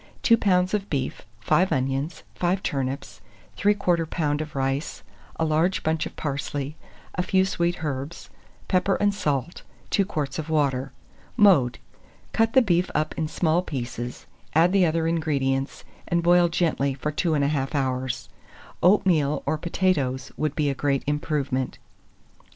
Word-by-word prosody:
2 230 - +6
lbs. 185 -4 +2
of 205 -1 -1
beef, 130 -6 -3
5 185 - +2
onions, 135 +4 -1
5 180 +2 0
turnips, 135 0 -3 0.3
3/4 180 -5 +2
lb. 150 -3 -1
of 155 -1 -7
rice, 135 +3 -2 0.3
a 160 - 0
large 160 +4 +1
bunch 160 0 0
of - - -13
parsley, 145 0 -3 0.4
a - - -1
few 190 +1 +2
sweet 175 -3 -1
herbs, 140 +2 -5 0.4
pepper 190 +1 +2
and 205 0 +2
salt, 150 -5 -2 0.3
2 200 - +3
quarts 150 -7 -3
of 160 0 -5
water. 135 -4 +1 0.5
Mode. 175 - +5 0.6
Cut 225 0 +2
the 260 - +6
beef 180 -3 +2
up 155 +1 0
in 160 - -1
small 165 +2 +1
pieces, 120 -6 -5 0.3
add 165 +3 +5
the 190 -3 +4
other 160 0 0
ingredients, 140 -5 -1 0.2
and 170 0 +1
boil 175 0 +5
gently 155 -5 0
for 150 +3 -3
21/2 145 -1 0
hours. 130 -2 -1 0.5
Oatmeal 170 -6 +3
or 155 - +1
potatoes 150 -6 0
would 155 -1 -2
be 145 -2 +1
a - - -1
great 140 0 0
improvement. 145 -3 -1
155 Hz, 145 wpm, -25 LUFS, 135-175 Hz, 0.6 s, 2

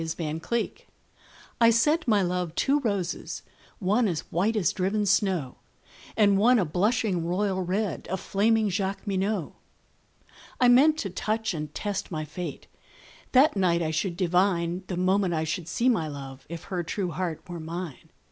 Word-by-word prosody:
The 160 0 -3
White 155 +1 -4
Flag 235 -1 -3 0.7
I 230 - +8
sent 295 +8 +2
my 210 -4 +4
love 180 -2 -2
two 285 +2 +2
roses, 200 -9 -3 0.3
one 210 +4 +2
As 170 -5 -1
white 200 +7 +1
as 190 -7 +1
driven 205 +2 0
snow, 190 - +1 0.6
And 200 -2 +4
one 245 +4 +5
a 195 - +2
blushing 190 +2 +1
royal 190 +2 0
red, 190 0 -2
A 190 - -1
flaming 215 +4 +2
Jacqueminot. 195 -1 -2 1.1
I 250 - +5
meant 290 +6 +6
to 195 - -3
touch 220 +2 -1
and 150 -2 -5
test 205 -2 -3
my 155 -3 -3
fate; 180 +3 -6 0.7
That 280 +5 +5
night 175 -3 +2
I 160 - -1
should 170 +2 -2
divine, 180 0 +1
The 180 - -3
moment 185 -1 +2
I 160 - 0
should 165 +1 -3
see 235 +8 0
my 185 -11 +2
love, 135 -2 -8
If 170 0 -6
her 180 -2 -3
true 180 +1 -3
heart 170 -2 -4
were 175 -2 -6
mine. 165 -2 -6
190 Hz, 165 wpm, -27 LUFS, 170-215 Hz, 1.1 s, I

